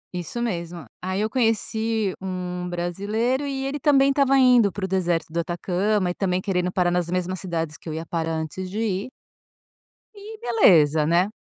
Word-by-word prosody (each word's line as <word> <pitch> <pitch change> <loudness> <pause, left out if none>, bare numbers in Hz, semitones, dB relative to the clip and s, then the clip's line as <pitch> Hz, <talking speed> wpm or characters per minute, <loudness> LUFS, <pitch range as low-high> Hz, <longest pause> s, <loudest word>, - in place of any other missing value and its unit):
Isso 180 +8 -4
mesmo. 170 -5 -4 0.2
Aí, 185 +2 -2
eu 215 - 0
conheci 225 -3 0
um 180 -1 -4
brasileiro, 205 +10 -1
e 270 -1 -3
ele 285 +2 -3
também 275 -1 +4
estava 275 -1 +3
indo 245 -6 +5
para 200 - -4
o - - -3
deserto 175 -4 -1
do 170 - 0
Atacama 180 +3 0
e, - - -4
também, 180 -1 0
querendo 180 -2 -1
parar 180 -1 +1
nas 175 -1 0
mesmas 185 0 -2
cidades 165 -4 -3
que - - -9
eu 155 - -4
ia 160 +1 -5
parar 165 -1 -2
antes 160 +4 -4
de 205 - -6
ir 215 +1 -1 1.1
e 425 +2 -10
beleza, 160 - +4
né? 175 +4 +3
185 Hz, 180 wpm, -24 LUFS, 175-225 Hz, 1.1 s, indo